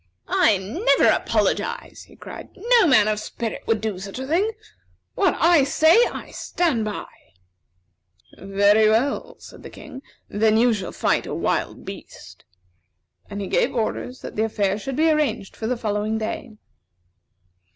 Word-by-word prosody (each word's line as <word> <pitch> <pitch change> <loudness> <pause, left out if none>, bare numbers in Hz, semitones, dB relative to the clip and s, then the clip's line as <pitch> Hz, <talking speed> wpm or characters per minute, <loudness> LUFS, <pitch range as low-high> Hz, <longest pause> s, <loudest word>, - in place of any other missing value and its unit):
"I 210 -3 +3
never 250 - +2
apologize," 475 +1 -1
he - - -18
cried. - - -10
"No 465 -1 +4
man 215 -8 +5
of 215 -1 0
spirit 225 +1 -5
would 225 -2 +1
do 215 -4 -3
such 195 +3 -8
a 260 - -4
thing. 350 +10 +1 0.6
What 385 -3 +1
I 330 -3 +5
say, 315 +4 +4 0.2
I - - -8
stand 305 -11 -1
by." 210 -1 -4 1.3
"Very 200 +3 +3
well," 280 - 0
said - - -14
the - - -10
King; 265 -3 -11 0.3
"then 215 +1 +2
you 240 +1 +4
shall 195 -4 -4
fight - - 0
a - - -4
wild - - -2
beast." - - -11 0.8
And 200 0 -5
he 195 - -4
gave - - 0
orders 250 +2 -3
that - - -8
the 215 - +1
affair 205 -2 -1
should 270 +4 -5
be 315 +3 +3
arranged 270 -10 -1
for 220 - -4
the 250 +1 -1
following 215 0 -2
day. 220 0 -5
225 Hz, 155 wpm, -22 LUFS, 210-300 Hz, 1.3 s, man